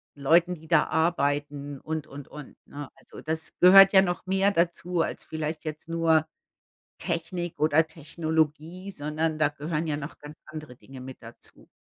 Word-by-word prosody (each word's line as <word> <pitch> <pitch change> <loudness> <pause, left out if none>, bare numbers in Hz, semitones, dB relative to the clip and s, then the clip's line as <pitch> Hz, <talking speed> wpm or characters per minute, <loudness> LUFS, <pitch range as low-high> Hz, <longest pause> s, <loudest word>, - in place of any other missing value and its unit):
Leuten, 170 +6 +3
die 160 -1 -15
da 165 - +4
arbeiten 145 -3 -1
und, 155 -1 -4
und, 140 0 -10
und, 150 -3 -11
ne? 145 -1 -8
Also, - - -13
das 160 +1 -4
gehört 195 +2 +9
ja 190 - +8
noch 175 -1 -2
mehr 195 +2 +2
dazu 175 0 0
als - - -3
vielleicht 155 0 -4
jetzt 155 +1 -6
nur 165 -1 +2 0.7
Technik 170 0 -3
oder 155 +1 +4
Technologie, 160 +3 -2
sondern 155 -1 -2
da 150 -1 +4
gehören 150 +2 -3
ja 150 -2 -1
noch 145 0 -7
ganz 150 +1 -11
andere 155 -5 -9
Dinge 135 0 -12
mit 130 0 -9
dazu. 115 +1 -9
160 Hz, 165 wpm, -27 LUFS, 145-170 Hz, 0.7 s, gehört